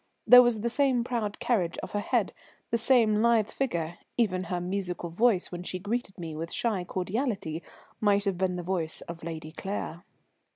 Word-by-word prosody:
There 250 0 +10
was 240 -3 +2
the 235 - 0
same 260 -3 +2
proud 230 -4 -2
carriage 185 -9 0
of - - -6
her 205 - -1
head, - - 0 0.4
the 235 - +3
same 225 -3 +4
lithe 230 -2 +3
figure, 170 -10 -2 0.2
even 185 -6 +1
her 180 0 -2
musical 180 -1 -3
voice 210 +1 +2
when 175 -1 -5
she 180 +1 -4
greeted 205 +1 -3
me 165 -3 -6
with 165 +2 -5
shy 215 -6 0
cordiality 190 - -2 0.4
might 205 -1 +3
have 195 -3 -1
been 185 -1 +1
the 175 - -4
voice 170 -3 -2
of 170 -1 -8
Lady 160 -1 -6
Claire. 175 -1 -5
195 Hz, 180 wpm, -28 LUFS, 175-230 Hz, 0.4 s, There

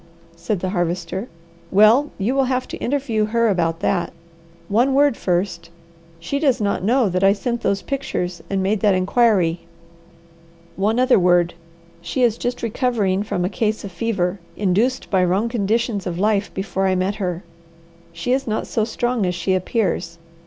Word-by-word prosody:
said 170 +3 -3
the 185 - -2
Harvester. 175 +3 -2 0.4
"Well 215 +9 +5
you 210 +6 0
will 270 -1 +2
have 255 0 -1
to - - -5
interview 245 -5 0
her 230 +1 +1
about 165 -4 0
that. 175 - 0 0.6
One 245 +6 +2
word 285 -2 +4
first. 175 -3 -2 0.5
She 280 +12 -3
does 275 -5 +2
not 200 -3 -1
know 240 +3 +3
that 185 0 -1
I 195 0 +6
sent 235 +4 -3
those 200 -3 0
pictures 265 -11 -3
and 195 -1 0
made 205 +2 +1
that 205 -2 +3
inquiry. 185 -3 +2 1.2
One 215 +5 +1
other 255 -3 +4
word. 175 -1 +3 0.5
She 175 +9 -1
is 235 -2 +2
just 245 0 -3
recovering 220 -5 0
from 180 -3 -2
a - - +1
case 215 +3 -1
of 200 - -7
fever, 190 -1 -1 0.2
induced 210 +7 0
by 190 -2 +3
wrong 190 +6 +1
conditions 220 -2 -1
of 170 -1 -3
life 205 +1 +1
before 190 0 -2
I 185 - +2
met 185 +3 -1
her. 180 -3 -3 0.7
She 170 +8 -3
is 265 +1 0
not 215 0 -1
so 220 - -1
strong 240 +1 -1
as 180 - -1
she 180 +2 0
appears. 185 -3 -1
200 Hz, 170 wpm, -21 LUFS, 185-235 Hz, 1.2 s, I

